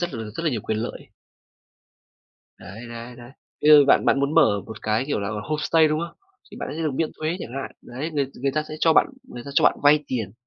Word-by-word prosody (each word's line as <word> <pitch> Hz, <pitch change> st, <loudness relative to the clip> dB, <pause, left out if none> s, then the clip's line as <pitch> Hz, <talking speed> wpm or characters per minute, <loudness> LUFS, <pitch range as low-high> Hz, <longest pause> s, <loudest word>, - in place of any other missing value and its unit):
rất 175 Hz, -5 st, -3 dB
là 115 Hz, -1 st, -5 dB
rất 165 Hz, -, -4 dB
là 155 Hz, -, +2 dB
nhiều 115 Hz, -5 st, -2 dB
quyền 110 Hz, +1 st, -2 dB
lợi. 115 Hz, -, -6 dB, 1.5 s
Đấy, 110 Hz, +6 st, -10 dB
đấy, 115 Hz, +1 st, -8 dB
đấy. 120 Hz, +1 st, -13 dB, 0.3 s
Bây 150 Hz, -, +5 dB
giờ 145 Hz, -2 st, +8 dB
bạn -, -, +4 dB
bạn 135 Hz, -, +3 dB
muốn 140 Hz, +2 st, 0 dB
mở 100 Hz, -1 st, +4 dB
một 110 Hz, -, -10 dB
cái, 110 Hz, +3 st, 0 dB
kiểu 145 Hz, -, -1 dB
là, 100 Hz, -, -3 dB
homestay, 155 Hz, +1 st, +2 dB
đúng 155 Hz, +1 st, 0 dB
không? 170 Hz, 0 st, -6 dB, 0.3 s
Thì -, -, -10 dB
bạn -, -, -5 dB
sẽ 165 Hz, -, -4 dB
được 155 Hz, -, 0 dB
miễn 155 Hz, +4 st, -1 dB
thuế 155 Hz, +3 st, -1 dB
chẳng 115 Hz, -, -7 dB
hạn. -, -, -7 dB
Đấy, 140 Hz, +7 st, -6 dB
người 145 Hz, -2 st, 0 dB, 0.2 s
người 140 Hz, -, +1 dB
ta 155 Hz, +2 st, -1 dB
sẽ 155 Hz, -, -5 dB
cho 160 Hz, 0 st, +4 dB
bạn -, -, +5 dB, 0.2 s
người 120 Hz, -, -10 dB
ta 140 Hz, -, -7 dB
cho -, -, +3 dB
bạn -, -, +4 dB
vay 150 Hz, +1 st, +5 dB
tiền 110 Hz, -7 st, -3 dB
140 Hz, 250 wpm, -23 LUFS, 115-155 Hz, 1.5 s, giờ